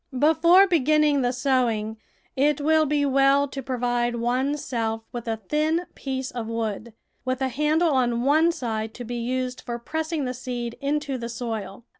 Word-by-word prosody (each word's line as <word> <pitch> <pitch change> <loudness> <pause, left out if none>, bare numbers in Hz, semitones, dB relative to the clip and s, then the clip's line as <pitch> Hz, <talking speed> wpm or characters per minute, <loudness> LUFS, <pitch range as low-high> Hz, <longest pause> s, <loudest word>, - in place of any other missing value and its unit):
Before 320 +6 +6
beginning 305 -4 +3
the 245 -1 +1
sowing 245 -4 0 0.4
it 290 +2 +2
will 310 +1 +3
be 290 0 +1
well 275 +1 +4
to 270 0 -6
provide 245 -2 -1
one's 255 +5 -1
self 225 -3 -2
with 240 -1 -6
a 225 -1 -1
thin 305 - 0
piece 265 -1 -4
of 235 -3 -5
wood, 225 0 -3 0.3
with 255 0 -2
a 265 -1 0
handle 305 +5 +2
on 240 -3 +1
one 310 +5 +4
side 225 -6 -4
to 245 - -7
be 240 +1 -4
used 255 +1 -2
for 240 -1 -5
pressing 315 +4 -3
the 250 - -2
seed 245 -2 -5
into 280 -1 -1
the 235 0 -5
soil. 225 -2 -5
255 Hz, 170 wpm, -24 LUFS, 235-295 Hz, 0.4 s, Before